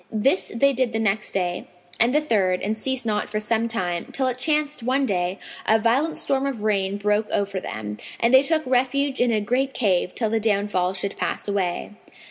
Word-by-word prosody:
This 270 Hz, -, +1 dB
they 275 Hz, +4 st, +4 dB
did 260 Hz, 0 st, +1 dB
on 230 Hz, -, -12 dB
the 225 Hz, -, 0 dB
next 215 Hz, -1 st, 0 dB
day 180 Hz, -2 st, -2 dB, 0.3 s
and 235 Hz, +2 st, +5 dB
the 295 Hz, -, +4 dB
third 195 Hz, -10 st, +1 dB
and 215 Hz, +2 st, -1 dB
ceased 260 Hz, +2 st, -2 dB
not 210 Hz, -2 st, -1 dB
for 215 Hz, 0 st, -2 dB
some 225 Hz, +2 st, +1 dB
time, 180 Hz, -7 st, -2 dB
till 265 Hz, -, -1 dB
it 255 Hz, -1 st, -1 dB
chanced 300 Hz, 0 st, 0 dB
one 260 Hz, +4 st, +1 dB
day, 180 Hz, -3 st, -1 dB, 0.3 s
a 220 Hz, -, +5 dB
violent 250 Hz, +8 st, +1 dB
storm 275 Hz, 0 st, 0 dB
of 245 Hz, -6 st, -4 dB
rain 200 Hz, -2 st, 0 dB
broke 210 Hz, +1 st, 0 dB
over 200 Hz, -1 st, -1 dB
them, 105 Hz, -, -6 dB, 0.2 s
and 235 Hz, +2 st, +2 dB
they 260 Hz, -, +9 dB
took 310 Hz, +2 st, 0 dB
refuge 265 Hz, +2 st, +1 dB
in 245 Hz, -1 st, +3 dB
a 220 Hz, -, +2 dB
great 255 Hz, +6 st, -1 dB
cave 185 Hz, -5 st, +1 dB
till 220 Hz, -3 st, -1 dB
the 225 Hz, -, +2 dB
downfall 200 Hz, -4 st, 0 dB
should 195 Hz, +1 st, -4 dB
pass -, -, -3 dB
away. 195 Hz, -3 st, -2 dB
220 Hz, 210 wpm, -23 LUFS, 200-260 Hz, 0.3 s, they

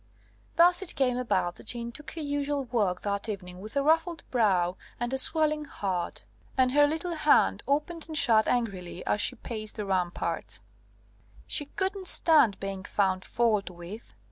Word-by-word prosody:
Thus 350 Hz, +2 st, +5 dB
it 385 Hz, -, -4 dB
came 255 Hz, -3 st, +1 dB
about 235 Hz, -8 st, -1 dB
that -, -, -14 dB
Jeanne 235 Hz, -1 st, -3 dB
took 300 Hz, +6 st, -10 dB
her 325 Hz, -, -4 dB
usual 285 Hz, -1 st, -2 dB
walk 210 Hz, -7 st, -1 dB
that 200 Hz, +2 st, -2 dB
evening 180 Hz, -3 st, -6 dB
with 215 Hz, +6 st, -7 dB
a 280 Hz, -, +2 dB
ruffled 325 Hz, +2 st, +1 dB
brow 185 Hz, -7 st, +2 dB, 0.2 s
and 240 Hz, +2 st, -2 dB
a -, -, +1 dB
swelling 305 Hz, +1 st, +3 dB
heart; 190 Hz, -10 st, -4 dB, 0.3 s
and 255 Hz, -1 st, +3 dB
her 290 Hz, +2 st, +5 dB
little 320 Hz, +3 st, -3 dB
hand 305 Hz, -2 st, +3 dB
opened 300 Hz, +4 st, -1 dB
and 315 Hz, -1 st, -5 dB
shut 220 Hz, -5 st, +4 dB
angrily 190 Hz, -7 st, -2 dB
as 205 Hz, -, 0 dB
she 255 Hz, -, 0 dB
paced 215 Hz, -2 st, -7 dB
the 210 Hz, -, -4 dB
ramparts. 180 Hz, -3 st, -2 dB, 0.9 s
She 290 Hz, -, -1 dB
couldn't 380 Hz, +3 st, -3 dB
stand 295 Hz, -, +6 dB
being 195 Hz, -1 st, -5 dB
found 190 Hz, -2 st, 0 dB
fault 220 Hz, -4 st, 0 dB
with. 180 Hz, +5 st, -11 dB
240 Hz, 170 wpm, -28 LUFS, 195-300 Hz, 0.9 s, stand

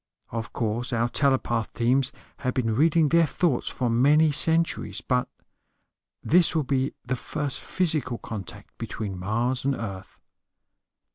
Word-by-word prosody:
Of 115 Hz, -2 st, -4 dB
course 115 Hz, +2 st, -2 dB
our 120 Hz, +1 st, +1 dB
telepath 130 Hz, -4 st, 0 dB
teams 125 Hz, +3 st, +2 dB, 0.3 s
have 130 Hz, -2 st, -3 dB
been 115 Hz, -4 st, 0 dB
reading 155 Hz, +4 st, +3 dB
their 165 Hz, 0 st, +4 dB
thoughts 150 Hz, -2 st, 0 dB
for 125 Hz, -, -2 dB
many 145 Hz, +7 st, +4 dB
centuries, 160 Hz, -, +2 dB
but 125 Hz, -1 st, 0 dB, 1.0 s
this 175 Hz, +1 st, +4 dB
will 155 Hz, -, +2 dB
be 135 Hz, 0 st, -1 dB
the 125 Hz, +1 st, -1 dB
first 140 Hz, +2 st, -3 dB
physical 155 Hz, -9 st, 0 dB
contact 105 Hz, -6 st, -8 dB
between 100 Hz, -4 st, -5 dB
Mars 120 Hz, +7 st, -1 dB
and 135 Hz, 0 st, +1 dB
Earth." 95 Hz, -5 st, -7 dB
130 Hz, 135 wpm, -25 LUFS, 115-150 Hz, 1.0 s, their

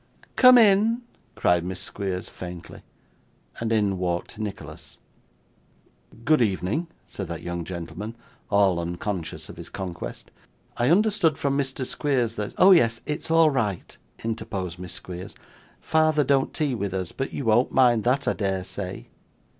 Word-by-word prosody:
'Come 255 Hz, -1 st, +8 dB
in,' 225 Hz, +2 st, +4 dB, 0.3 s
cried 90 Hz, -1 st, +2 dB
Miss 90 Hz, 0 st, -5 dB
Squeers 95 Hz, -3 st, -4 dB
faintly. 90 Hz, -1 st, -9 dB, 0.8 s
And 115 Hz, -1 st, -2 dB
in 100 Hz, -4 st, +1 dB
walked 90 Hz, +3 st, -3 dB
Nicholas. 105 Hz, -1 st, -7 dB, 1.3 s
'Good 155 Hz, -3 st, +4 dB
evening,' 105 Hz, -, 0 dB, 0.2 s
said 95 Hz, -, -6 dB
that 85 Hz, -1 st, -6 dB
young 85 Hz, 0 st, -4 dB
gentleman, 95 Hz, +6 st, -6 dB, 0.3 s
all 100 Hz, -4 st, +3 dB
unconscious 85 Hz, +1 st, -4 dB
of -, -, -11 dB
his -, -, -9 dB
conquest. 85 Hz, -10 st, -7 dB, 0.5 s
'I 120 Hz, +2 st, +2 dB
understood 195 Hz, -4 st, +3 dB
from 140 Hz, -1 st, 0 dB
Mr. 135 Hz, -2 st, -2 dB
Squeers 125 Hz, -5 st, 0 dB
that 105 Hz, -1 st, -4 dB
' -, -, -28 dB
'Oh 185 Hz, +2 st, +7 dB
yes; 115 Hz, -10 st, +4 dB
it's 150 Hz, +2 st, -4 dB
all 165 Hz, -1 st, +5 dB
right,' 105 Hz, -9 st, -2 dB, 0.2 s
interposed 95 Hz, -6 st, -4 dB
Miss 90 Hz, -1 st, -6 dB
Squeers. 90 Hz, -1 st, -8 dB, 0.4 s
'Father 155 Hz, -1 st, +2 dB
don't 135 Hz, 0 st, +2 dB
tea 150 Hz, -4 st, -1 dB
with 100 Hz, -5 st, -3 dB
us, 95 Hz, -2 st, -3 dB
but 135 Hz, -, -4 dB
you 140 Hz, -, -4 dB
won't 115 Hz, +3 st, +3 dB
mind 120 Hz, -4 st, +4 dB
that, 130 Hz, +3 st, +1 dB
I -, -, +3 dB
dare 95 Hz, -3 st, -1 dB
say. 95 Hz, 0 st, -6 dB
110 Hz, 150 wpm, -25 LUFS, 95-140 Hz, 1.3 s, Come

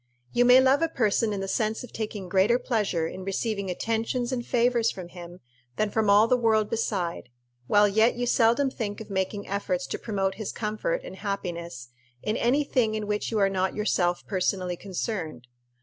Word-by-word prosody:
You 245 Hz, -, +4 dB
may 250 Hz, +1 st, +8 dB
love 265 Hz, +3 st, +4 dB
a 330 Hz, -, +3 dB
person 220 Hz, -5 st, +1 dB
in 200 Hz, -2 st, -3 dB
the 195 Hz, -, -3 dB
sense 220 Hz, +4 st, -1 dB
of 250 Hz, -, -11 dB
taking 210 Hz, -3 st, -5 dB
greater 195 Hz, +6 st, +3 dB
pleasure 210 Hz, -10 st, -1 dB
in 185 Hz, +3 st, -6 dB
receiving 200 Hz, 0 st, -2 dB
attentions 230 Hz, +6 st, -1 dB
and 250 Hz, -2 st, -2 dB
favors 240 Hz, -1 st, +2 dB
from 180 Hz, -2 st, -7 dB
him 175 Hz, 0 st, -11 dB, 0.3 s
than 215 Hz, -1 st, 0 dB
from 220 Hz, -1 st, +1 dB
all 205 Hz, +2 st, +6 dB
the 250 Hz, -, +4 dB
world 220 Hz, -2 st, +2 dB
beside, 190 Hz, -, -2 dB, 0.4 s
while 205 Hz, +5 st, +5 dB
yet 220 Hz, +4 st, +3 dB
you 245 Hz, 0 st, -1 dB
seldom 240 Hz, +3 st, +3 dB
think 210 Hz, -5 st, -4 dB
of 220 Hz, -2 st, -9 dB
making 195 Hz, +1 st, -2 dB
efforts 190 Hz, -2 st, -2 dB
to -, -, -5 dB
promote 195 Hz, -3 st, -1 dB
his 210 Hz, -, -3 dB
comfort 220 Hz, -, -2 dB
and 190 Hz, -, -9 dB
happiness 170 Hz, -, -5 dB, 0.3 s
in 215 Hz, -, -1 dB
any 260 Hz, +6 st, +2 dB
thing 235 Hz, -6 st, +1 dB
in 215 Hz, -1 st, -3 dB
which 210 Hz, 0 st, -2 dB
you 225 Hz, -, -1 dB
are 200 Hz, -1 st, +4 dB
not 190 Hz, -1 st, -1 dB
yourself 180 Hz, -4 st, 0 dB
personally 185 Hz, -2 st, -1 dB
concerned. 175 Hz, -, -4 dB
210 Hz, 190 wpm, -26 LUFS, 190-230 Hz, 0.4 s, may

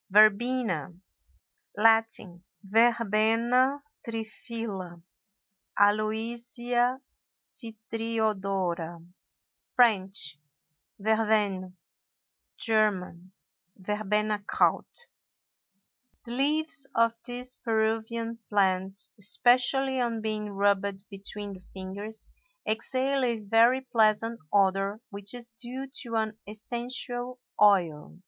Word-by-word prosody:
VERBENA. 215 Hz, -, +3 dB, 0.8 s
Latin—Verbena 225 Hz, +4 st, +2 dB, 0.2 s
triphylla, 220 Hz, -5 st, -5 dB, 0.8 s
Aloysia 235 Hz, +4 st, +1 dB, 0.4 s
citriodora; 205 Hz, -7 st, -2 dB, 0.7 s
French—Verveine; 195 Hz, -, 0 dB, 0.8 s
German—Verbenakraut. 210 Hz, -, -1 dB, 1.2 s
The 235 Hz, -, -7 dB
leaves 285 Hz, +2 st, +2 dB
of 230 Hz, 0 st, +2 dB
this 250 Hz, +1 st, +1 dB
Peruvian 225 Hz, 0 st, -2 dB
plant, 195 Hz, -1 st, 0 dB
especially 255 Hz, +5 st, +5 dB
on 235 Hz, -2 st, -1 dB
being 215 Hz, -1 st, -3 dB
rubbed 200 Hz, 0 st, -1 dB
between 200 Hz, +1 st, -5 dB
the 185 Hz, -, -12 dB
fingers, 200 Hz, +3 st, -7 dB, 0.4 s
exhale 260 Hz, +5 st, 0 dB
a 235 Hz, -2 st, 0 dB
very 230 Hz, +5 st, +3 dB
pleasant 225 Hz, -2 st, +1 dB
odor 195 Hz, +1 st, +1 dB
which 200 Hz, +3 st, -2 dB
is 240 Hz, -1 st, -5 dB
due 250 Hz, +4 st, -5 dB
to 235 Hz, -3 st, -6 dB
an 220 Hz, -1 st, -2 dB
essential 245 Hz, +3 st, -3 dB, 0.2 s
oil. 180 Hz, -7 st, +2 dB
220 Hz, 70 wpm, -27 LUFS, 195-235 Hz, 1.2 s, especially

